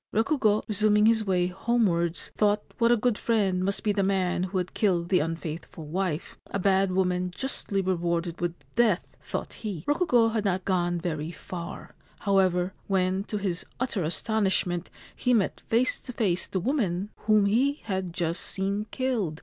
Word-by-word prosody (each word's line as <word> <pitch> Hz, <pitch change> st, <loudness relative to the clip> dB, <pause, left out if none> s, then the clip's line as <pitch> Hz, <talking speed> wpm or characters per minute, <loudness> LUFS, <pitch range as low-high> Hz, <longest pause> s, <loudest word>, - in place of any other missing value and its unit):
Rukugo, 220 Hz, -2 st, +2 dB
resuming 210 Hz, 0 st, +3 dB
his 225 Hz, 0 st, +4 dB
way 185 Hz, -3 st, +1 dB
homewards, 180 Hz, -3 st, 0 dB
thought 210 Hz, 0 st, +2 dB, 0.2 s
what 230 Hz, 0 st, +4 dB
a 240 Hz, -, +5 dB
good 225 Hz, 0 st, +1 dB
friend 195 Hz, -5 st, +1 dB
must 200 Hz, +1 st, -1 dB
be 210 Hz, -, +2 dB
the 200 Hz, -1 st, +1 dB
man 190 Hz, -2 st, +1 dB
who 190 Hz, +1 st, -3 dB
had 180 Hz, -1 st, -2 dB
killed 175 Hz, -5 st, +1 dB
the 185 Hz, -, +4 dB
unfaithful 165 Hz, 0 st, -5 dB
wife. 170 Hz, 0 st, -3 dB
A -, -, -2 dB
bad 195 Hz, 0 st, +2 dB
woman 180 Hz, -1 st, +1 dB
justly 200 Hz, -2 st, -1 dB
rewarded 170 Hz, -2 st, -1 dB
with 175 Hz, -1 st, -1 dB, 0.2 s
death, 225 Hz, -6 st, +2 dB
thought -, -, -4 dB
he. 200 Hz, -8 st, -5 dB
Rokugo 290 Hz, -7 st, +3 dB
had 220 Hz, -2 st, -1 dB
not 190 Hz, -2 st, 0 dB
gone 175 Hz, -2 st, +1 dB
very 160 Hz, -3 st, -3 dB
far, 170 Hz, 0 st, -8 dB, 0.3 s
however, 185 Hz, -2 st, +2 dB
when, 190 Hz, 0 st, +1 dB
to 210 Hz, -, -3 dB
his 190 Hz, -4 st, -2 dB, 0.2 s
utter 250 Hz, -6 st, -1 dB
astonishment, 185 Hz, 0 st, 0 dB, 0.3 s
he 250 Hz, -1 st, +2 dB
met 205 Hz, -4 st, 0 dB
face 240 Hz, +3 st, +2 dB
to 250 Hz, -, -9 dB
face 190 Hz, -7 st, 0 dB
the 190 Hz, -, -2 dB
woman 200 Hz, -, -1 dB, 0.2 s
whom 215 Hz, -2 st, +5 dB
he 265 Hz, +8 st, +2 dB
had 190 Hz, -4 st, -2 dB
just 170 Hz, -1 st, -1 dB
seen 200 Hz, +2 st, -2 dB
killed. 220 Hz, -12 st, -1 dB
195 Hz, 165 wpm, -27 LUFS, 180-215 Hz, 0.3 s, a